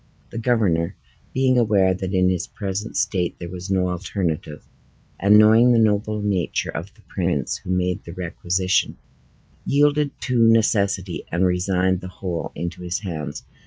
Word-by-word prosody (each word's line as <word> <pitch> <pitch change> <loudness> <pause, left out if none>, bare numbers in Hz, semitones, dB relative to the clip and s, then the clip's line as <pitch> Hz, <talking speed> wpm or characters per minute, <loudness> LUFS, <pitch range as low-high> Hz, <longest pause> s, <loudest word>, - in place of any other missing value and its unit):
The 115 - -5
governor, 100 -8 +1 0.4
being 130 -1 +2
aware 100 -5 +3
that 95 0 -4
in 90 -1 +3
his 90 -2 0
present 100 +1 -4
state 95 -2 0
there 85 -1 -7
was 90 +1 -7
no 95 -1 +1
alternative, 85 -4 -3 0.5
and 100 +2 +6
knowing 110 +3 +6
the - - +4
noble 105 -1 +1
nature 95 -4 -1
of 85 +5 -6
the 110 - -22
prince 85 -8 -1
who - - -12
made 90 -1 0
the 85 - -9
requisition, 90 +1 -1 0.7
yielded 145 +1 +1
to 120 -3 +3
necessity, 100 -5 +1
and 85 +3 +2
resigned 90 0 +1
the 95 - -7
whole 90 -2 -5
into 85 +2 -5
his 90 0 -3
hands. 80 -7 -5
95 Hz, 155 wpm, -22 LUFS, 90-105 Hz, 0.7 s, and